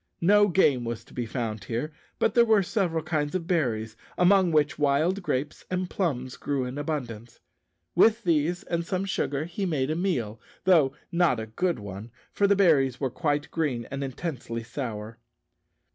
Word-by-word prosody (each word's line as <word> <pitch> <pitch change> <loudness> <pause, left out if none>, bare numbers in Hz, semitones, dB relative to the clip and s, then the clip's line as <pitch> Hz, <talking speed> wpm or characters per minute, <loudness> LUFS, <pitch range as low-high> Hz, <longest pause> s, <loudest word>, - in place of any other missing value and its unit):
No 205 +4 +5
game 150 -9 +3
was 115 -1 -4
to - - -19
be 120 -2 -3
found 110 -3 -4
here, 125 +7 -3 0.2
but - - +1
there 235 - +6
were 220 -3 +4
several 180 -5 -1
kinds 150 -1 -1
of 175 -3 -2
berries, 115 - -1 0.2
among 180 0 +4
which 150 -2 +2
wild 150 +7 +2
grapes 145 -4 -3
and 185 0 -2
plums 130 -9 -2
grew 140 -3 -2
in 125 +3 -5
abundance. 120 -7 -5 0.5
With 220 +6 +4
these 170 +1 +1
and 170 -1 -2
some 185 +2 -2
sugar 145 -6 -1
he 180 +3 -3
made 145 -4 0
a - - 0
meal, 120 - -2 0.2
though 155 -8 +4 0.2
not 170 -8 +2
a 110 - -4
good 170 +11 -1
one, 100 +1 -8 0.2
for 200 - +2
the 200 - +4
berries 140 -10 +3
were 135 -3 -1
quite 145 0 -1
green 135 -8 -1
and 140 0 -3
intensely 130 -4 -4
sour. 115 -3 -6
150 Hz, 175 wpm, -27 LUFS, 125-180 Hz, 0.5 s, there